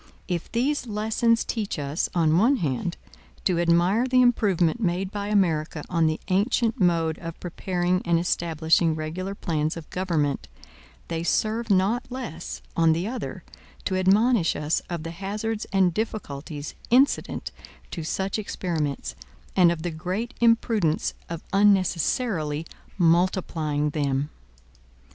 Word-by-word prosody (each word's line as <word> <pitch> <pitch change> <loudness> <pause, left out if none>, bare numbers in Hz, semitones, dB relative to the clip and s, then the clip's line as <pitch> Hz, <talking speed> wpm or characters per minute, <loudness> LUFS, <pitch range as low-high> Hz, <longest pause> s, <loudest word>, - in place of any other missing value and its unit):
If 175 -3 -3
these 260 +3 0
lessons 220 +2 +1
teach 215 -6 -3
us, 145 +2 -2
on 165 -1 +4
one 245 +7 +4
hand, 170 - -2 0.5
to 180 -3 +2
admire 175 +8 +3
the 255 0 +4
improvement 205 -4 +2
made 185 0 0
by 205 -1 -4
America 165 -7 +1
on 165 -2 +3
the 155 0 -1
ancient 220 +4 +1
mode 165 -4 +2
of 165 -1 -7
preparing 180 +1 -1
and 170 -1 +2
establishing 165 -1 +1
regular 175 +5 -4
plans 155 -3 -1
of 165 - -8
government, 165 -7 -1 0.6
they 165 -1 -2
serve 220 +6 0
not 200 +6 +2
less, 210 -11 -6
on 165 -1 +4
the 170 +5 -2
other, 250 +2 -5 0.4
to 190 - 0
admonish 195 +1 +3
us 150 +2 0
of 170 -3 -4
the 165 - -5
hazards 210 +5 -3
and 190 -3 +3
difficulties 155 -8 -4 0.2
incident 260 +4 +2 0.4
to 165 - -4
such 190 +6 -2
experiments, 165 -8 -3 0.4
and 180 -3 +6
of 165 -2 -4
the 175 - -2
great 185 +10 -3
imprudence 230 -8 +2 0.2
of 170 -1 -5
unnecessarily 185 - +2 0.3
multiplying 165 -4 +1
them. 140 -1 -1
180 Hz, 130 wpm, -25 LUFS, 160-210 Hz, 0.6 s, and